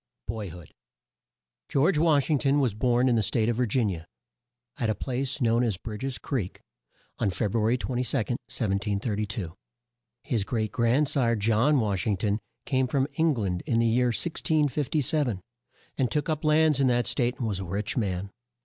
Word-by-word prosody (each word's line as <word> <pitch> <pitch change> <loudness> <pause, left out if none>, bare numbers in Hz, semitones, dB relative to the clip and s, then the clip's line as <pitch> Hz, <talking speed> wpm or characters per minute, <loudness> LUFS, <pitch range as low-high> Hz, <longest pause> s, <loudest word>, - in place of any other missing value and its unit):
BOY 105 -2 -4
HOOD. 85 -2 -12 1.0
George 150 +4 +3
Wash 155 -2 +3
ing 145 - +3
ton 140 +1 +2
was 130 -7 +1
born 120 +3 +2
in 125 - +3
the 110 - +3
State 110 +2 +1
of 115 - 0
Vir 125 -1 +1
gin 110 0 +1
i - - -1
a, 80 - -11 0.7
at 115 -4 0
a 110 - +1
place 135 +4 -2
known 120 -1 +2
as 110 -6 0
Bridg 105 +4 -7
es 135 -2 -2
Creek, 115 -10 -3 0.6
on - - +1
Feb 100 +2 -2
ru 115 - +2
a - - +1
ry 115 +3 +3
22, 125 +1 -1
1732. 105 -4 -2 0.7
His 115 -5 0
great 110 -1 -2
grand 125 +5 +2
sire, 120 -4 +2
John 115 +7 +3
Wash 100 -5 -1
ing 105 -3 +1
ton, 105 +2 0 0.3
came 130 -2 +1
from 135 +1 +1
Eng 160 -2 +3
land 95 -6 -2
in 115 - +1
the 115 - +3
year 120 +2 +3
1657, 150 - 0 0.6
and 130 -3 +2
took 150 +2 -1
up 155 -1 -1
lands 155 -1 +4
in 135 - +4
that 120 -1 +2
state 125 -1 0
and 120 - -2
was 100 -3 -2
a 95 - -4
rich 100 +4 -3
man. 100 -4 -2
120 Hz, 190 wpm, -27 LUFS, 105-135 Hz, 1.0 s, lands